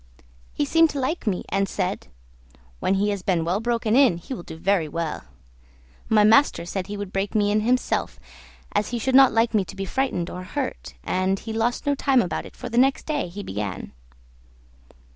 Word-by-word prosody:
He 290 - 0
seemed 330 +2 +4
to 285 - -4
like 270 0 -2
me, 185 -4 -1
and 195 -1 0
said, - - -3 0.7
"When 195 - +1
he 205 +2 +1
has 200 -2 -3
been 180 -3 0
well 180 +4 0
broken 230 -1 0
in 260 -10 +5
he 175 +10 -7
will 240 - -6
do 160 - -10
very 180 -1 +1
well." 165 - -4 0.8
My 215 -1 +5
master 220 -5 +4
said 185 +1 -4
he 205 0 -5
would 200 -1 -6
break 195 +2 -2
me 205 -1 +2
in 215 +1 +2
himself, 250 +3 0 0.5
as 205 +1 0
he 245 - -2
should 260 +3 -1
not 265 0 +8
like 225 +1 +2
me 210 -3 +3
to - - -11
be 195 0 -4
frightened 190 -6 -1
or 180 - -6
hurt, 65 - -5
and 185 - 0
he 220 +2 -7
lost 230 +5 -1
no 285 - +2
time 270 -2 +2
about 175 - -4
it, - - -16
for - - -7
the 235 - +1
next 270 +1 +2
day 295 - -1
he 200 +4 -7
began. 100 - -5
205 Hz, 205 wpm, -24 LUFS, 185-250 Hz, 0.8 s, not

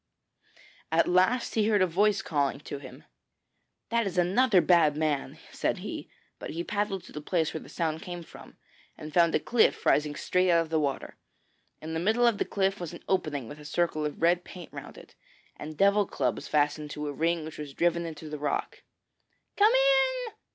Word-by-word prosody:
At 165 +1 +3
last 185 +7 +2
he 215 -2 +2
heard 210 -3 +3
a - - +5
voice 195 +3 +2
calling 140 -3 0
to 145 - -7
him. - - -12 0.9
'That 230 -2 +1
is 185 - -5
another 190 +4 +4
bad 170 -5 +4
man,' 155 -3 -1
said - - -1
he; - - -7 0.3
but - - -7
he 170 +2 -4
paddled 205 -1 -2
to - - -14
the 150 - -7
place 160 0 0
where 160 - -5
the - - -13
sound 160 -2 -2
came 175 -3 -7
from, - - -14 0.4
and 155 0 -9
found 170 -2 +4
a - - +3
cliff 240 -2 +2
rising 150 0 +2
straight 185 +3 +1
out 170 -1 +5
of 165 - -5
the 160 - +2
water. 140 -3 -3 0.7
In 160 +1 -5
the 160 - -1
middle 220 +7 +2
of 230 -4 +2
the - - +1
cliff 195 0 0
was 175 -2 -6
an 170 - -11
opening 155 -9 -1
with 145 +4 -10
a - - -11
circle 155 0 -1
of 150 -1 -4
red 175 +2 +3
paint 175 -2 -11
round - - -9
it, - - -14 0.4
and 155 0 -8
devil 200 +1 +4
clubs 125 -3 -2
fastened 150 0 0
to 150 0 -5
a 145 - -3
ring 165 +2 0
which 155 - -9
was 145 -2 -7
driven 170 0 +1
into 160 -1 -8
the 150 -1 -6
rock. 145 -1 -3 0.7
'Come 420 +2 +5
in! - - +2
170 Hz, 200 wpm, -28 LUFS, 150-195 Hz, 0.9 s, a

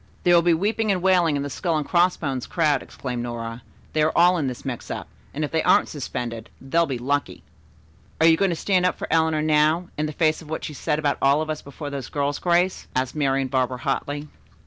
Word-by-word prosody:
"There 175 - +4
will 170 - +7
be 170 0 +3
weeping 215 +4 0
and 190 - +1
wailing 180 -5 +3
in 140 - -1
the 145 - -4
'Skull 165 +3 -1
and 150 - -3
Crossbones' 170 -7 +1
crowd,'" 150 -6 +1
exclaimed 125 -2 -5
Nora. 115 0 -5 0.3
"They 155 - +2
are 155 +1 +3
all 175 +2 +6
in 145 - -1
this 125 +1 -6
mix 125 -3 -5
up, - - -5 0.2
and 150 - -3
if - - -8
they 160 - +1
aren't - - +4
suspended, 120 -5 -5
they'll 165 +5 +1
be 130 - -2
lucky." 130 -6 -2 0.8
"Are 160 - +4
you 165 0 +7
going 195 +3 +1
to 170 - -1
stand 185 +2 +1
up - - -2
for - - -5
Eleanor 160 -1 +2
now, 155 +3 +2
in 155 - 0
the - - -4
face 155 +1 +1
of 155 - -13
what 160 - -4
she 150 - -5
said 150 - -1
about 145 -2 0
all 140 +2 +4
of 155 - -4
us 155 - -4
before 145 +1 -8
those 140 -3 -5
girls, 145 0 -1
Grace?" 180 +1 +1
asked 130 0 0
Marian 135 -2 +1
Barber 130 -1 0
hotly. 145 +3 -3
150 Hz, 235 wpm, -23 LUFS, 135-170 Hz, 0.8 s, will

